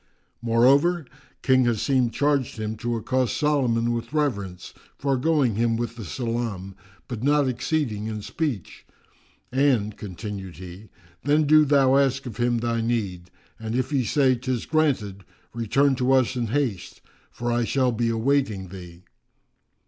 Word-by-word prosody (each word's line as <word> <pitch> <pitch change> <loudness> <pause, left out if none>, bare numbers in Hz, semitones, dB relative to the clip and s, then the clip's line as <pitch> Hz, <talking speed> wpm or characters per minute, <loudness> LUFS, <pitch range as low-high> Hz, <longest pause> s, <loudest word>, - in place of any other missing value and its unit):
Moreover, 135 +9 +3 0.4
King 130 -1 +4
Asim 120 +2 +1
charged 140 -1 0
him 110 0 -3
to 120 +2 -2
accost 125 +1 -1
Solomon 125 -6 +1
with 115 +3 -5
reverence, 100 - -2 0.2
foregoing 135 -1 +1
him 115 +2 +1
with 115 -1 -3
the 115 -3 -8
salam, 115 -4 -3 0.3
but 120 -3 -5
not 145 +1 +3
exceeding 130 -4 -1
in 110 -2 -5
speech; 140 - -4 0.7
"and 125 -6 +2
(continued 100 -2 -7
he) 95 +4 -10 0.3
then 150 +2 +3
do 155 +1 +5
thou 135 -2 +4
ask 135 -1 +1
of 120 -5 -7
him 120 0 +1
thy 115 0 -1
need, 100 -7 -2 0.3
and 110 +1 -4
if 130 +3 -1
he 135 -3 +1
say 130 +3 +3
'tis 125 -1 -3
granted, 125 -12 0 0.3
return 135 +5 +2
to 130 +1 +1
us 130 -1 +2
in 120 -2 -1
haste, 110 -8 -2 0.3
for 120 0 -3
I 120 0 +1
shall 130 +2 +1
be 115 0 0
awaiting 115 -5 0
thee." 90 -2 -11
120 Hz, 145 wpm, -24 LUFS, 110-135 Hz, 0.7 s, do